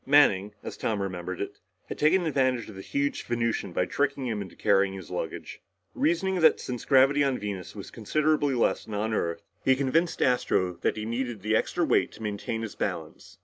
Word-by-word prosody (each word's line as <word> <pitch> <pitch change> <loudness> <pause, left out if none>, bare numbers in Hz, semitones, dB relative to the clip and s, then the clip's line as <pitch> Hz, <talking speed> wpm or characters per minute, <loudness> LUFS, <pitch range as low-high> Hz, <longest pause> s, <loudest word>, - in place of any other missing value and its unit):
Manning, 105 -8 +4
as - - -6
Tom 110 -2 -1
remembered 95 -2 -4
it, - - -5 0.3
had - - -6
taken 170 +4 +4
advantage 130 -6 +1
of 110 - -9
the 95 - -7
huge 140 +7 -1
Venusian 115 -5 -1
by 90 - +1
tricking 140 +4 -1
him 110 -4 -2
into 95 -3 -8
carrying 100 -1 +2
his 95 -4 -9
luggage. - - -5 0.3
Reasoning 180 +3 +1
that 160 - +5
since 125 -2 -5
the - - -16
gravity 135 +1 +5
of 135 -2 +2
Venus 100 -3 -5
was 100 - -8
considerably 145 +4 +1
less 120 - +1
than 110 - -8
that 105 - -1
of 110 - -2
Earth, 85 -5 -1 0.2
he 130 - +4
convinced 150 +6 +1
Astro 105 -7 +2
that - - 0
he 110 - -3
needed 120 -2 -3
the 110 +1 +2
extra - - +1
weight - - +2
to - - -10
maintain 105 +2 -3
his 110 - -5
balance. - - -5
115 Hz, 205 wpm, -27 LUFS, 100-140 Hz, 0.3 s, that